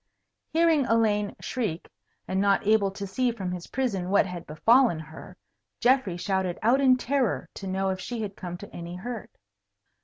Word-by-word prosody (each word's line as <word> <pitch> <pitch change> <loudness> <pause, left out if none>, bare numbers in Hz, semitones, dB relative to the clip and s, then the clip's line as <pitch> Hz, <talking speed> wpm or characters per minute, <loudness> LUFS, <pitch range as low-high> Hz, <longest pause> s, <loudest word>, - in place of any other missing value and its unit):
Hearing 320 -4 +3
Elaine 210 -3 +2
shriek, 210 -10 -3 0.4
and 190 +1 0
not 200 0 +2
able 210 -1 +4
to 200 +1 -6
see 245 +6 0
from 195 -6 -4
his 180 -1 -6
prison 205 -9 -2
what 200 - +4
had 180 -2 -7
befallen 225 - +4
her, 160 0 -11 0.4
Geoffrey 245 -8 +2
shouted 185 0 -1
out 250 +5 +4
in 260 -2 +5
terror 255 -2 0
to 195 - -7
know 190 +1 0
if 190 0 -2
she 230 +3 -4
had 200 -2 -5
come 175 -1 -6
to 205 - -11
any 170 +1 -6
hurt. 225 +3 -6
200 Hz, 175 wpm, -27 LUFS, 185-245 Hz, 0.4 s, in